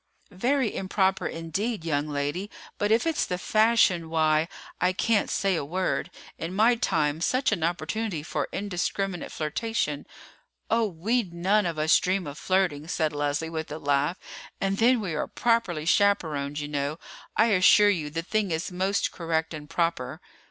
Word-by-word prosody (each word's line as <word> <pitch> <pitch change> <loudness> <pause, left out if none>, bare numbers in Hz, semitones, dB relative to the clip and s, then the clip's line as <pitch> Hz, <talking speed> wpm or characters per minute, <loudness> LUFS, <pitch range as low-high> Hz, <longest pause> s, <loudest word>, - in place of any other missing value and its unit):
"Very 245 +5 0
improper, 190 0 +1
indeed, 165 +5 -3
young 145 -2 0
lady; 145 +7 -2 0.3
but 205 +1 +1
if 225 +5 +3
it's 325 -2 +1
the 180 - -2
fashion, 215 -4 +3
why, 155 0 +2 0.3
I 180 +1 +2
can't 220 +2 +1
say 195 -3 +1
a 160 - -1
word. 180 +4 -1 0.3
In 170 +3 -4
my 225 +4 +5
time 155 -9 0
such 255 +8 +1
an - - -1
opportunity 170 +2 -2
for - - -3
indiscriminate 195 -1 -2
flirtation——" 155 -1 -2 0.6
"Oh, 230 -1 +3
we 210 +7 0
none 190 +2 +1
of 165 -2 -3
us 155 +1 +4
dream 185 0 0
of 145 0 -7
flirting," 175 -4 0
said 160 -2 0
Leslie 145 +2 -1
with 160 -2 -5
a 150 - -4
laugh; 145 +3 0 0.4
"and 195 0 -1
then 240 +1 +4
we 185 -6 -3
are 150 - -2
properly 230 -10 0
chaperoned, 160 -7 +2
you 150 -1 -3
know. 145 +1 -2 0.4
I 220 +1 +4
assure 205 +2 +6
you 160 -6 -2
the 165 +2 -3
thing 210 +2 0
is 160 +3 -2
most 190 +2 0
correct 160 -1 -2
and 150 -1 -8
proper." 160 -4 -1
175 Hz, 165 wpm, -26 LUFS, 155-205 Hz, 0.6 s, assure